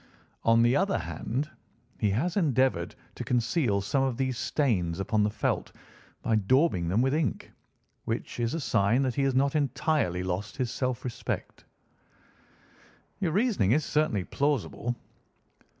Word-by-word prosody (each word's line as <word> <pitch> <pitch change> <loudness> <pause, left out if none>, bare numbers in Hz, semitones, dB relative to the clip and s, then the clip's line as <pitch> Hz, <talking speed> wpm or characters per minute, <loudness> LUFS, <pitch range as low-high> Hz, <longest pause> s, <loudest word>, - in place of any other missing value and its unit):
On 115 0 +5
the 120 +2 +4
other 195 +7 +2
hand, 140 +7 -3 0.5
he 105 - +2
has 135 - 0
endeavoured 135 - +1 0.2
to - - -6
conceal 120 - +1
some 135 +8 0
of 130 -3 0
these 130 -1 0
stains 105 - 0
upon 105 +2 +1
the 105 - +3
felt - - -1 0.5
by 110 - +2
daubing 110 - +2
them 100 +8 +2
with 135 +1 +1
ink, 150 - -1 0.5
which - - -3
is 120 +4 0
a - - -1
sign 115 -1 +2
that 130 -2 0
he 140 - 0
has 135 -1 +1
not 140 +2 +2
entirely 135 - +1
lost 95 +3 -3
his 125 -2 -1
self 125 -1 -2
respect." 125 - -4 1.5
"Your 180 -5 0
reasoning 200 - +2
is 155 +2 +2
certainly 150 - +1
plausible." 125 -1 -1
125 Hz, 150 wpm, -28 LUFS, 105-145 Hz, 1.5 s, On